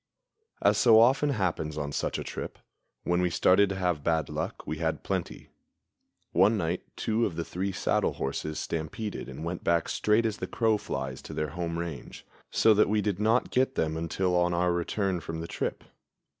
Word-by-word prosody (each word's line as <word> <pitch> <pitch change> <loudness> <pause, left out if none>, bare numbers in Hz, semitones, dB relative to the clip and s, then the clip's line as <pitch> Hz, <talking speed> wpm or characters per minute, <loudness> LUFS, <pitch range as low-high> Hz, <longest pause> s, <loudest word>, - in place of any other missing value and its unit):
As - - +4
so 115 -2 +7
often 135 +5 +4
happens 90 - -1
on 70 -1 -3
such - - -2
a - - -4
trip, - - -6 0.5
when 85 0 +1
we 90 - +2
started 95 +4 +4
to 100 - -2
have 90 -5 -1
bad 80 -3 +1
luck - - -4
we 80 - -4
had 80 -1 -1
plenty. - - -4 0.8
One 100 +6 +4
night 85 -1 -1
two 110 +1 0
of 85 - -7
the 85 - -3
three 95 +2 -3
saddle - - 0
horses 75 +3 -3
stampeded 85 +4 -4
and 65 +4 -7
went 85 +1 -4
back 85 -1 +2
straight 110 +2 +2
as 110 -1 -1
the - - -4
crow 110 -2 +1
flies 65 -6 -4
to - - -9
their 75 -1 -1
home 85 +1 -3
range, 85 -3 -6 0.2
so 110 - +5
that 105 -1 +3
we 105 0 +2
did 100 -2 -1
not 110 +3 +2
get 130 +1 +2
them 80 0 0
until 90 +3 -1
on 90 0 +2
our 90 0 +2
return 90 +2 -1
from 80 0 -6
the 85 - -5
trip. - - -3
90 Hz, 195 wpm, -28 LUFS, 80-105 Hz, 0.8 s, so